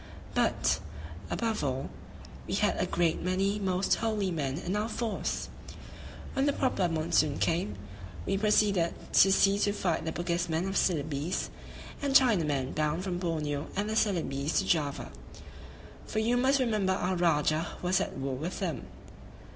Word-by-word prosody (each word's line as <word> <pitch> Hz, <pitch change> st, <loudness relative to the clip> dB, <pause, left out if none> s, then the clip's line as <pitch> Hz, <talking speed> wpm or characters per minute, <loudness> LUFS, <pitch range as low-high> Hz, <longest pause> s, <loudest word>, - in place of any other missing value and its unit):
but, -, -, +2 dB, 0.5 s
above 225 Hz, -, -1 dB
all, 135 Hz, -1 st, -1 dB, 0.6 s
we -, -, -1 dB
had -, -, +2 dB
a -, -, +1 dB
great 170 Hz, -2 st, +1 dB
many 195 Hz, +3 st, 0 dB
most 190 Hz, -1 st, +1 dB
holy 215 Hz, -4 st, 0 dB
men 140 Hz, -4 st, -2 dB
in 180 Hz, +3 st, -3 dB
our 210 Hz, +2 st, -1 dB
force! 225 Hz, 0 st, -2 dB, 0.9 s
When 270 Hz, +1 st, +1 dB
the 285 Hz, -, +3 dB
proper 200 Hz, -11 st, +1 dB
monsoon 155 Hz, -2 st, +1 dB
came, 165 Hz, -, 0 dB, 0.5 s
we -, -, 0 dB
proceeded 200 Hz, -4 st, +2 dB, 0.2 s
to 195 Hz, -, +7 dB
sea 195 Hz, +1 st, +4 dB
to 205 Hz, -, +2 dB
fight 170 Hz, -5 st, -1 dB
the 160 Hz, -, -2 dB
Bugismen 170 Hz, 0 st, -1 dB
[of 195 Hz, -, -3 dB
Celebes] 155 Hz, -1 st, 0 dB, 0.5 s
and 280 Hz, -2 st, -1 dB
Chinamen 155 Hz, -, +3 dB
bound 155 Hz, +3 st, 0 dB
from 180 Hz, -2 st, -2 dB
Borneo 150 Hz, -4 st, -2 dB
and 205 Hz, +2 st, -1 dB
the 215 Hz, -, -2 dB
Celebes 165 Hz, -9 st, 0 dB
to -, -, +2 dB
Java; 145 Hz, -4 st, 0 dB, 1.0 s
for -, -, -5 dB
you 225 Hz, +3 st, +2 dB
must 265 Hz, +3 st, +3 dB
remember 215 Hz, -7 st, +1 dB
our 185 Hz, -1 st, -1 dB
Rajah 160 Hz, -1 st, +2 dB, 0.2 s
was 180 Hz, +1 st, +2 dB
at -, -, -4 dB
war 135 Hz, 0 st, -2 dB
with 160 Hz, +8 st, -4 dB
them. 165 Hz, -10 st, -3 dB
180 Hz, 155 wpm, -30 LUFS, 155-205 Hz, 1.0 s, to